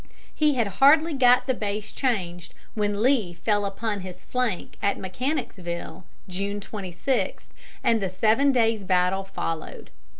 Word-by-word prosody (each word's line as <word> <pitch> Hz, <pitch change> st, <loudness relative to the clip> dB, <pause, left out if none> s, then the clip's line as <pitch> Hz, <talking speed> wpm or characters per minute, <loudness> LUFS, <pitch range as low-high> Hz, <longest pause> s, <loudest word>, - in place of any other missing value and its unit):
He 300 Hz, -2 st, +2 dB
had 235 Hz, -3 st, +2 dB, 0.2 s
hardly 310 Hz, +4 st, +6 dB
got 250 Hz, -2 st, +5 dB
the 260 Hz, -, +1 dB
base 210 Hz, -2 st, -4 dB
changed 180 Hz, -9 st, -2 dB, 0.2 s
when 205 Hz, 0 st, -1 dB
Lee 230 Hz, -10 st, +2 dB
fell 205 Hz, +3 st, 0 dB
upon 205 Hz, +1 st, -3 dB
his 185 Hz, -1 st, -9 dB
flank 250 Hz, -7 st, -2 dB
at 200 Hz, -, +1 dB
Mechanicsville, 185 Hz, -, -4 dB, 0.2 s
June 200 Hz, +2 st, -3 dB
26, 200 Hz, +4 st, -3 dB, 0.4 s
and 225 Hz, -2 st, +3 dB
the 190 Hz, -, -1 dB
Seven 220 Hz, +9 st, +3 dB
Days' 225 Hz, -4 st, +2 dB
battle 185 Hz, +1 st, +2 dB
followed. 165 Hz, -4 st, -5 dB
205 Hz, 135 wpm, -25 LUFS, 185-250 Hz, 0.4 s, hardly